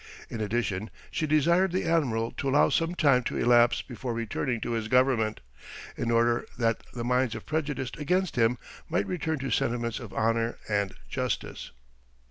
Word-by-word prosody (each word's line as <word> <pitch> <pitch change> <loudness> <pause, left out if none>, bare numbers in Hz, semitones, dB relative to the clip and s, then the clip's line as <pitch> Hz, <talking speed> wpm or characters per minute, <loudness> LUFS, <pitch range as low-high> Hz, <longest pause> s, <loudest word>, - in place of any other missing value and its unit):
In 115 - -4
addition, 105 -2 -1 0.2
she 155 - -1
desired 170 +5 +3
the 185 - -1
admiral 125 -9 +1
to 140 - -1
allow 145 +2 +4
some 165 +1 0
time 140 -7 +4
to - - -2
elapse 120 0 +4
before 120 -1 -5
returning 115 +2 -2
to - - -3
his 115 -2 -1
government, 125 - +2 0.5
in 115 - -2
order 115 0 +3
that 115 -2 +1
the 120 - -5
minds 125 -1 +1
prejudiced 145 -5 -2
against 180 +5 0
him 120 0 +3 0.3
might 100 - +1
return 160 - -2
to 135 -1 -4
sentiments 115 -1 0
of 120 -5 -9
honour 115 +1 0
and 100 -2 0
justice. - - -3
120 Hz, 160 wpm, -28 LUFS, 115-145 Hz, 0.5 s, allow